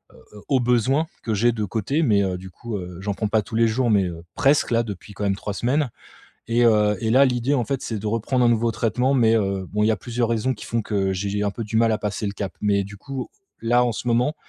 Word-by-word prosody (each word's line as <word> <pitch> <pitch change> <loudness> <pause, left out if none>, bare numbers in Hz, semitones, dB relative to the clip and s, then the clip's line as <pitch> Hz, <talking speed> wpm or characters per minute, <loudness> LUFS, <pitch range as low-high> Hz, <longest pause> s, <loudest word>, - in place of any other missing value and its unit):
heu - - -17 0.2
heu, 105 - -11
au 135 -3 +3
besoin 125 +5 +2 0.2
que 110 - -1
j'ai 120 +4 +3
de 110 -2 -3
côté 110 - -1
mais 105 -8 +3
heu, 95 -2 -1
du 95 +1 -10
coup, 115 +4 -6
heu, 90 -2 -7
j'en 100 +1 -2
prends 105 +2 -2
pas 110 +1 +2
tous 115 - -8
les 115 0 +4
jours 120 +2 +1
mais 100 -3 +3
heu, 85 -2 -6
presque-là 135 -4 +3
depuis 105 -1 -8
quand 105 - -5
même 100 -1 +1
3 105 +1 -5
semaines 130 +7 0 0.6
et 120 +1 +3
heu 105 -2 +4
et 110 -2 -1
là, 130 +4 +6
l'idée, 125 +1 +1
en 125 -4 +1
fait, 135 +2 -3
c'est 110 - -3
de 105 - -6
reprendre 115 +3 +1
un - - +5
nouveau 115 0 +2
traitement 125 +5 +1
mais 115 -4 +4
heu, 100 -3 -1
bon, 105 +1 +1
il - - +3
y - - +4
a - - 0
plusieurs 120 +4 -2
raisons 115 +3 0
qui 105 - -10
font 115 -1 -1
que 100 -2 0
j'ai 95 +2 -2
j'ai 105 +1 -1
un 100 - +1
peu 115 +3 -5
du 110 +1 -3
mal 115 0 +4
à 110 - 0
passer 105 +1 -3
le 100 - -2
cap. 100 -1 -5
Mais 100 -1 +1
du 100 +1 -10
coup, 135 +5 -6 0.3
là, 120 +2 +3
en 120 - 0
ce 115 - -6
moment 120 +5 +2
110 Hz, 280 wpm, -23 LUFS, 100-120 Hz, 0.6 s, là